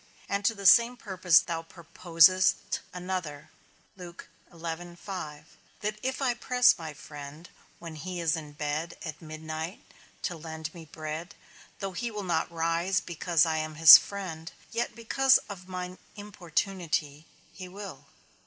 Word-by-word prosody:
And 200 0 -2
to 225 - +3
the 200 -1 -9
same 235 +4 +6
purpose 185 -6 +3
thou 165 -2 -4
proposest 170 +2 +2
another, 180 -5 -5 0.4
that 175 +2 -8
if 260 +2 -3
I 250 -2 +2
press 250 0 +3
my 160 -2 -6
friend, 150 +3 -10 0.3
when 165 -2 -9
he 180 +3 -5
is 165 -2 +1
in 150 -2 -8
bed 150 +2 -3
at 155 -2 -7
midnight, 155 +2 -6 0.4
to 180 - -2
lend 160 0 -7
me 165 -2 -11
bread, 155 +2 -7 0.4
though 195 -1 -4
he 235 +6 -3
will 210 -2 -6
not 170 -3 -1
rise 170 +3 0
because 170 -1 +1
I 160 -1 0
am 155 0 -4
his 160 +1 +11
friend, 165 -5 -7 0.2
yet 235 +1 -2
because 265 +3 +4
of 185 -3 -9
mine 180 0 -6 0.2
importunity 170 -6 -3 0.3
he 185 -2 -9
will. 195 +2 -9
170 Hz, 135 wpm, -28 LUFS, 160-195 Hz, 0.4 s, his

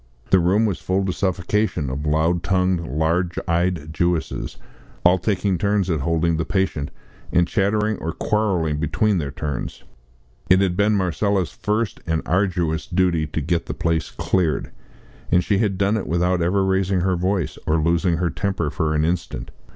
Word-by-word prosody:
The 95 - +6
room, 95 +6 +3
was 100 -5 -1
full 95 +1 0
to 95 - -1
suffocation 90 -5 -1
of 70 +3 -4
loud 80 +3 +2
tongued, 90 0 +1
large 80 +5 0
eyed 85 -2 0
Jewesses, 85 0 -1 0.5
all 90 +1 +5
taking 95 -1 0
turns 100 -2 +1
at 80 - 0
holding 80 +3 +1
the 80 - 0
patient, 95 -6 -1 0.4
and 85 0 +3
chattering 105 +2 +1
or 80 - -3
quarrelling 90 -7 0
between 95 +6 +1
their 70 -3 -3
turns. 70 -1 -5 0.7
It 95 0 +6
had 95 -2 +1
been 105 +2 +3
Marcella's 95 0 0
first 105 +1 -2
and 80 -1 0
arduous 90 -4 0
duty 85 -3 +1
to 80 - -3
get 85 +3 -1
the - - -4
place 85 -1 0
cleared, 85 -6 -1 0.6
and 90 - +4
she 100 0 +1
had 100 -4 0
done 100 +3 +2
it 110 - -3
without 90 +1 +1
ever 95 +3 +2
raising 95 -1 +1
her 95 0 +1
voice 90 0 -1
or 80 - +3
losing 85 +2 +2
her 85 0 0
temper 95 -7 -2
for 80 -1 -1
an 75 +1 +2
instant. 75 -6 -3
90 Hz, 170 wpm, -22 LUFS, 80-95 Hz, 0.7 s, The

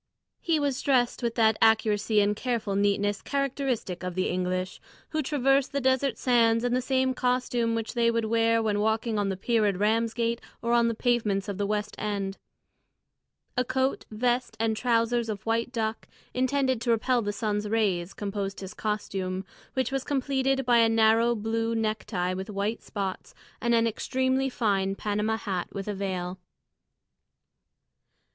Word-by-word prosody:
He 330 -3 +1
was 280 -3 -1
dressed 255 -3 +2
with 235 -1 -1
that 220 -2 +3
accuracy 215 -1 +3
and 205 +1 +2
careful 225 -4 -2
neatness 205 0 +1
characteristic 270 -9 -2
of 180 -1 -4
the 185 - 0
English, 185 0 -2 0.3
who 310 - -1
traverse 275 -1 +2
the 280 - -2
desert 260 -1 +1
sands 230 -2 +3
in 245 0 +1
the 255 - +2
same 260 0 +1
costume 250 -2 0
which 225 -1 -3
they 235 -1 +3
would 230 -1 0
wear 230 0 +2
when 210 -2 0
walking 220 +1 0
on 200 -1 0
the 190 - -2
pier 220 +1 +2
at 195 -3 0
Ramsgate 230 +3 +1 0.2
or 235 0 -1
on 235 -1 +4
the 230 - -1
pavements 220 -5 0
of 200 -1 -4
the 200 - 0
West 210 0 -2
End. 200 -2 -3 1.2
A 250 - +2
coat, 260 +2 -1
vest, 240 +1 -1
and 225 -1 +1
trousers 230 0 +1
of 215 0 -5
white 230 +2 0
duck, 225 -3 -3 0.3
intended 260 -1 +1
to 235 - -2
repel 235 +2 +2
the 205 -1 -2
sun's 210 -1 -2
rays, 195 -5 0
composed 200 -1 -4
his 190 +1 -7
costume, 195 -3 -3 0.3
which 260 0 0
was 270 -1 -1
completed 270 -1 0
by 240 -1 +5
a 230 -1 +5
narrow 225 +1 +4
blue 225 +1 -1
necktie 215 -5 -1
with 190 +3 -5
white 205 +2 -2
spots, 195 -3 -5 0.3
and 235 0 +2
an 230 0 +3
extremely 260 +4 0
fine 195 -6 0
Panama 210 +2 -1
hat 190 -5 -3
with 195 0 -5
a 210 - -1
veil. 185 -2 -3
225 Hz, 165 wpm, -27 LUFS, 205-245 Hz, 1.2 s, by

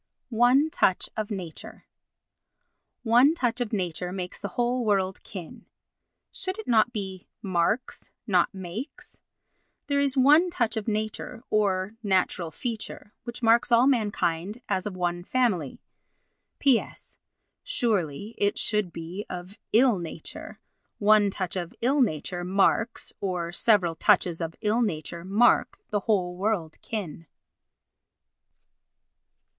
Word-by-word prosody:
"One 250 +6 +4
Touch 185 - +2
of 215 -1 -3
Nature" 185 -6 -7 1.2
"One 250 +7 +5
touch 245 -5 0
of 235 - -2
nature 180 -3 -2
makes 180 -1 -5
the 200 - -4
whole 245 +1 +1
world 195 -3 0
kin." 180 -5 -10 0.6
Should 375 +1 -4
it 440 - -8
not 230 0 +4
be 190 -4 -6 0.2
"marks," 195 +6 -1 0.2
not 185 -6 +2
"makes"? 195 - -8 0.6
There 285 -1 +1
is 280 -1 +1
one 300 +7 +6
touch 235 -10 0
of 220 -1 -3
nature, 215 +2 -3
or 200 -2 +1
natural 185 -4 +1
feature, 220 - -6
which 240 +1 -7
marks 230 +1 +4
all 235 +2 +6
mankind 210 -4 0
as 190 +2 -1
of 190 -3 -6
one 175 -1 -1
family. 190 - 0 0.7
P.S.—Surely 225 - -2
it 205 0 +1
should 210 -5 +1
be 170 +5 -7
"of 180 +4 -8
ill 235 -3 +4
nature." 165 -2 -8 0.4
"One 210 -1 +5
touch 190 -2 -3
of 175 -2 -4
ill 270 +4 +2
nature 175 - -1
marks—or 190 -2 0
several 180 -2 +3
touches 180 -2 +2
of 165 0 -4
ill 220 +2 +1
nature 170 -5 -3
mark 205 +6 +3
the 205 - +1
whole 185 -4 0
world 185 -5 -2
kin." 170 -7 -5
205 Hz, 120 wpm, -26 LUFS, 180-235 Hz, 1.2 s, one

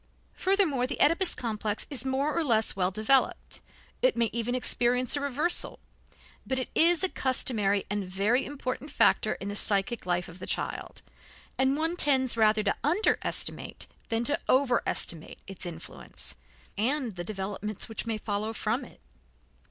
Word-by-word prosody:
Furthermore, 360 -10 +1
the - - -5
Oedipus 340 +4 +3
complex 215 -3 -3
is 260 -4 +2
more 270 +3 -1
or 335 - +1
less 225 -6 +1
well 185 -2 +1
developed; 215 +7 0 0.4
it - - +2
may 230 -2 +1
even 235 +1 -2
experience 250 0 +3
a 285 - -2
reversal, 290 +5 +1 0.7
but 260 - -3
it 260 - -3
is 340 +2 +4
a - - +5
customary 215 - 0
and 205 0 -2
very 205 +8 +1
important 275 0 -5
factor - - +2
in 195 - -7
the 205 - -4
psychic 200 +1 +1
life 175 0 0
of 175 +2 -12
the - - -8
child; - - -3 0.5
and 265 +1 +1
one 325 +2 -1
tends 265 -7 +4
rather 215 -1 +3
to 200 - +1
underestimate 350 +9 0 0.2
than 225 +1 0
to 290 +4 +1
overestimate 245 - +1
its 195 -1 -5
influence 165 -1 -8 0.4
and 255 +2 +1
the 175 - -5
developments 205 +1 -4
which 225 +1 -5
may 225 -1 -1
follow 215 +1 -3
from 225 +4 -1
it. - - -15
240 Hz, 155 wpm, -28 LUFS, 210-280 Hz, 0.7 s, a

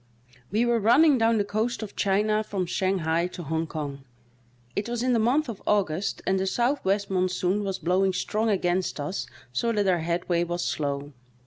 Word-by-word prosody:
E 220 +4 +2
were 240 -1 +2
running 260 +6 +5
down 225 0 +3
the 205 - +2
coast 220 +3 -2
of 210 - -8
China 215 +2 +1
from 195 -3 -2
Shang 190 +2 0
hai 165 +2 +1
to 180 -1 -8
Hong 160 +2 -2
Kong; 145 -4 -5 0.7
it 205 +3 -2
was 240 0 -2
in 255 0 +2
the 230 - +3
month 260 +7 +2
of 225 -4 -6
August 195 -3 0
and 190 0 +2
the 190 - -1
southwest 205 -4 0
monsoon 185 +2 0
was 195 -1 -2
blowing 185 +3 +2
strong 215 +4 -1
against 180 -4 0
us 145 +7 -3 0.3
so 230 - 0
that 205 -3 +1
our 180 -2 +3
headway 170 +1 0
was 175 0 -2
slow. 145 -1 -2
195 Hz, 190 wpm, -26 LUFS, 175-220 Hz, 0.7 s, running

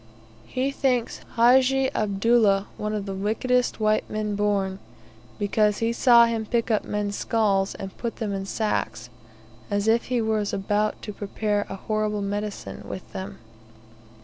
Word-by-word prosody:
He 260 +2 -1
thinks 255 -4 0 0.2
Hajji 260 +3 +4
Abdullah 205 -1 +3
one 210 0 -3
of 205 -2 -3
the 195 - -4
wickedest 235 +6 0
white 215 0 +1
men 215 -1 -2
born, 200 -2 0 0.6
because 210 0 +2
he 230 +1 0
saw 235 -1 +6
him 230 -1 -1
pick 235 +1 0
up 215 - +2
men's 205 -1 -2
skulls 200 -4 +1
and 195 -1 -7
put 235 -1 -3
them 210 -3 -3
in 195 0 -4
sacks, 120 - -2 0.6
as 205 +1 0
if 230 +1 +3
he 250 -1 0
was 220 -2 0
about 205 +2 0
to 210 - -5
prepare 205 +1 -2
a - - -4
horrible 210 +1 -1
medicine 205 +1 -4
with 185 - -8
them. 195 +1 -6
210 Hz, 150 wpm, -25 LUFS, 200-230 Hz, 0.6 s, saw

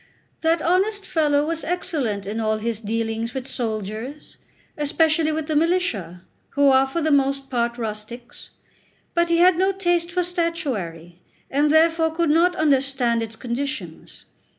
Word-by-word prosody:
That 325 0 +1
honest 400 +4 +1
fellow 295 -2 +1
was 325 +1 -2
excellent 285 - -2
in 210 +3 -4
all 215 -1 0
his 225 0 -2
dealings 225 +2 -3
with 265 -1 -4
soldiers, 220 +4 -5 0.4
especially 315 +2 +2
with 310 0 -2
the 310 0 -2
militia, 295 - 0 0.3
who 285 -1 +3
are 265 0 +4
for 335 +5 -3
the 315 0 +1
most 275 -1 +1
part 235 -1 0
rustics; 225 +2 -7 0.6
but 340 0 +1
he 335 - +3
had 355 0 +5
no 380 +1 +3
taste 350 -3 0
for 360 0 0
statuary, 245 - -3 0.3
and 290 +2 +2
therefore 325 +1 +4
could 325 -1 0
not 350 +3 +3
understand 270 -6 +1
its 225 0 -5
conditions. 270 +5 -5
285 Hz, 150 wpm, -22 LUFS, 230-335 Hz, 0.6 s, had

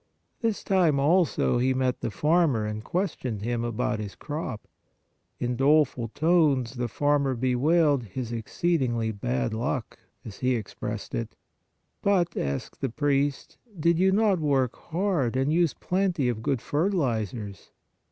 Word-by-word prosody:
This 225 -3 -1
time 175 -7 +3
also 155 -4 +2
he 130 +1 +2
met 130 -1 0
the - - -1
farmer 150 - +2
and 105 0 -4
questioned 130 - -2
him 120 0 -1
about 120 -1 -1
his 105 -2 -6
crop. 145 -7 -5 0.7
In 125 0 -1
doleful 135 -2 +3
tones 145 -3 +2
the 120 -2 -2
farmer 140 +2 +1
bewailed 135 +3 +2
his 120 +4 -5
exceedingly 120 -1 0
bad 65 - -2
luck, 120 +2 -3 0.3
as 100 -3 -9
he 125 0 +1
expressed 110 -4 -5
it. - - -4 0.3
" - - -49
But," 190 -4 +2
asked 70 -1 -3
the 135 - 0
priest, 140 +2 -1
" 205 -7 -17
did 170 +2 +3
you 190 +1 +4
not 200 -2 +3
work 135 -5 +1
hard 170 - -1
and 135 +3 +1
use 170 -2 +2
plenty 180 -8 0
of 115 -3 -3
good 125 +1 -1
fertilizers?" 120 - -1
135 Hz, 145 wpm, -26 LUFS, 115-165 Hz, 0.7 s, you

